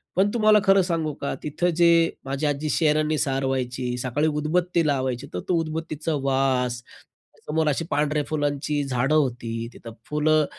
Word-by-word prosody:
पण 190 +3 +3
तुम्हाला 215 -2 +5
खरं 195 -1 +5
सांगू 165 -4 -1
का, 140 - -2
तिथं 155 +4 0
जे 170 +1 +4 0.4
माझी 135 +3 -2
आजी 145 +1 -1
शहरांनी 155 -1 +2
सार 135 -2 0
व्हायची, 125 -1 -2
सकाळी 130 +5 0
उदबत्ती 165 +3 0
लावायची, 130 -1 -1
तर 90 - -2
तो - - +3
उदबत्तीचा 160 0 -3
वास, 130 -2 +1
त्या - - -24
समोर 160 0 +1
अशी 150 +3 -1
पांढऱ्या 150 0 +1
फुलांची 145 -1 -1
झाडं 135 +2 0
होती, 120 -5 -1
तिथं 115 -1 -11 0.2
फुलं 155 0 +2
150 Hz, 160 wpm, -24 LUFS, 135-155 Hz, 0.4 s, तुम्हाला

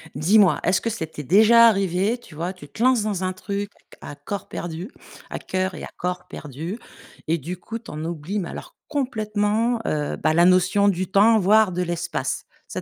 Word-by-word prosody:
Dis-moi, 185 +3 +4
est-ce 185 +1 +2
que 230 - -1
ça 215 -7 -3
t'est 150 -1 -8
déjà 220 - +6
arrivé 195 +1 +1
tu 175 -10 -16
vois? 170 +4 -3
Tu 180 -6 -13
te 145 - -10
lances 255 -4 +4
dans 200 -3 -2
un 185 0 -1
truc 200 +2 -4 0.3
à - - -8
corps 175 +8 -6
perdu, 175 +5 -6 0.4
à - - -5
cœur 185 0 -2
et - - -8
à - - -6
corps 180 0 -4
perdus, 155 - -7 0.5
et 165 +2 +2
du 170 +5 -6
coup, 225 +6 -7
tu 225 - -13
en 155 +1 -5
oublies, 170 +4 -3
mais 180 - -4
alors - - -9
complètement, 225 -3 0
heu, 150 -1 -1
bah, 155 +1 +1
la 170 +2 +5
notion 185 +3 +4
du 185 -1 0
temps, 215 +3 +5
voire 210 +1 +4
de 180 +1 -2
l'espace. 170 -6 -3 0.2
Ça - - -5
185 Hz, 200 wpm, -23 LUFS, 170-215 Hz, 0.5 s, déjà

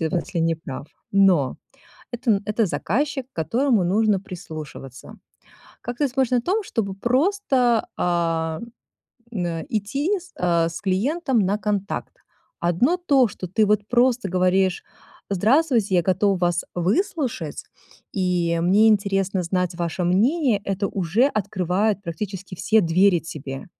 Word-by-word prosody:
если 170 +1 -2
не 165 0 +2
прав, 145 -3 -8 0.3
но 185 -9 +3 0.6
это 240 0 0
н 200 -2 +2
это 215 +1 +1
заказчик, 265 - -1
к - - -66
которому 230 - +1
нужно 205 +2 +2
прислушиваться. 155 -8 -9 0.7
Как 240 -1 -6
ты 290 - +2
смотришь 260 -1 0
на 245 -1 +3
том, 395 - 0
чтобы 215 - -2
просто, 255 - +1
а, 165 -2 0 0.7
н 185 -7 -2
э, 165 -2 -3
идти, 275 - -1
с 365 0 -16
а, 170 -2 +2
с 165 - -7
клиентом 250 - 0
на 200 +1 +1
контакт? 205 -2 -3 0.4
Одно 175 - +2
то, 280 -9 +3
что 185 -1 -7
ты 215 +3 +2
вот 210 0 +1
просто 245 -2 +2
говоришь: 185 +1 +1 0.5
"Здравствуйте, 225 - +2
я 175 - +3
готов 190 +2 +1
вас 175 -1 +1
выслушать 230 - -1 0.5
и 175 -3 0
мне 205 +5 +5
интересно 195 -2 +1
знать 180 0 -1
ваше 170 +1 -2
мнение",- 225 - +2
это 195 0 -1
уже 195 - +1
открывает 200 - -1
практически 190 +2 -6
все 220 +5 +3
двери 180 +1 +3
тебе. 140 -4 -7
195 Hz, 135 wpm, -23 LUFS, 175-240 Hz, 0.7 s, мне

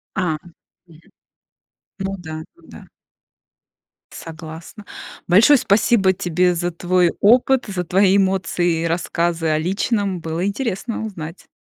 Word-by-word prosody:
А. 170 -5 -1 0.5
Мгм. 165 0 -20 0.9
Ну 195 0 -3
да, 160 -2 -7
ну - - -23
да. - - -12 1.3
Согласна. 165 +5 -10 0.4
Большое 220 +11 +6
спасибо 200 -3 +3
тебе 180 0 0
за 175 +1 -2
твой 175 0 +1
опыт, 250 +4 +4
за 190 -3 -3
твои 190 +3 +3
эмоции 180 -3 0
и - - -1
рассказы 170 0 -1
о 155 - +2
личном. 195 +2 -1
Было 165 +2 -3
интересно 220 +1 -3
узнать. 170 -5 -8
180 Hz, 120 wpm, -20 LUFS, 165-200 Hz, 1.3 s, Большое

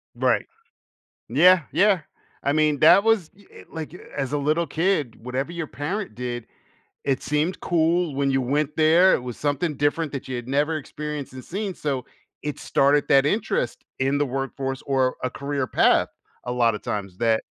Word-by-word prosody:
Right. - - +1 0.8
Yeah, 180 -2 +6
yeah. 190 +3 +4 0.4
I 140 - +1
mean, 155 -1 +2
that 165 +5 +7
was, 225 -7 +2
i 205 - -16
eh, - - -14
like, 160 0 -6 0.2
as 135 -2 -2
a 145 - +1
little 155 +4 +1
kid, 160 -9 0
whatever 130 +4 -3
your 170 -2 -4
parent 180 - -4
did, 120 -1 -5 0.6
it 135 -2 0
seemed 150 +5 0
cool 170 -1 +1
when 140 0 +1
you 135 0 +2
went 145 +4 -1
there, 165 +4 +5
it 125 - 0
was 125 -2 -6
something 145 +2 -1
different 145 +2 0
that 140 - -6
you'd 125 -2 -5
never 150 +4 +1
experienced 150 -1 -6
and 130 -1 -9
seen, 195 +1 -4
so 135 -6 -3 0.4
it 150 -1 -4
started 145 +1 +2
that 135 0 +5
interest 150 - -1 0.2
in 135 +2 +1
the 145 - +1
workforce 135 0 -3
or 130 -2 +1
a 125 - 0
career 140 0 -3
path - - +3 0.4
a 125 - -3
lotta 115 -3 +2
times 100 -3 -5
that 115 0 +2
145 Hz, 175 wpm, -24 LUFS, 130-160 Hz, 0.8 s, that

